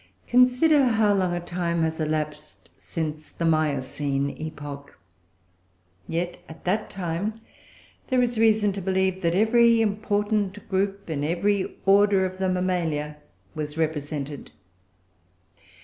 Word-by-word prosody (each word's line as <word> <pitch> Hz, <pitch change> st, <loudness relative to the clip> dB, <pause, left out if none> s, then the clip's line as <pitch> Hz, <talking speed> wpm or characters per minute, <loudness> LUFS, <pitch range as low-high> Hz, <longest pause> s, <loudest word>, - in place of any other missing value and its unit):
Consider 255 Hz, +5 st, +4 dB
how 220 Hz, -4 st, +3 dB
long 185 Hz, -3 st, +1 dB
a -, -, -1 dB
time 170 Hz, -1 st, -2 dB
has 160 Hz, 0 st, -1 dB
elapsed 150 Hz, -, -4 dB
since 155 Hz, -, -5 dB
the 170 Hz, -, -4 dB
Miocene 140 Hz, -3 st, 0 dB
epoch. 145 Hz, -2 st, -8 dB, 1.1 s
Yet, 175 Hz, +2 st, -3 dB
at 160 Hz, -, -12 dB
that 205 Hz, +4 st, 0 dB
time 195 Hz, +4 st, -3 dB, 0.7 s
there 255 Hz, -1 st, +2 dB
is 240 Hz, -2 st, -1 dB
reason 215 Hz, -2 st, +4 dB
to 195 Hz, -, -5 dB
believe 190 Hz, 0 st, 0 dB
that 170 Hz, 0 st, +1 dB
every 230 Hz, +3 st, +5 dB
important 205 Hz, -1 st, 0 dB
group 195 Hz, +1 st, -1 dB
in 145 Hz, -2 st, -2 dB
every 190 Hz, +5 st, 0 dB
order 200 Hz, -1 st, +5 dB
of 185 Hz, 0 st, -5 dB
the 190 Hz, -1 st, +1 dB
Mammalia 170 Hz, -5 st, -1 dB, 0.4 s
was 150 Hz, 0 st, -5 dB
represented. 150 Hz, -3 st, -3 dB
180 Hz, 120 wpm, -25 LUFS, 155-205 Hz, 1.1 s, every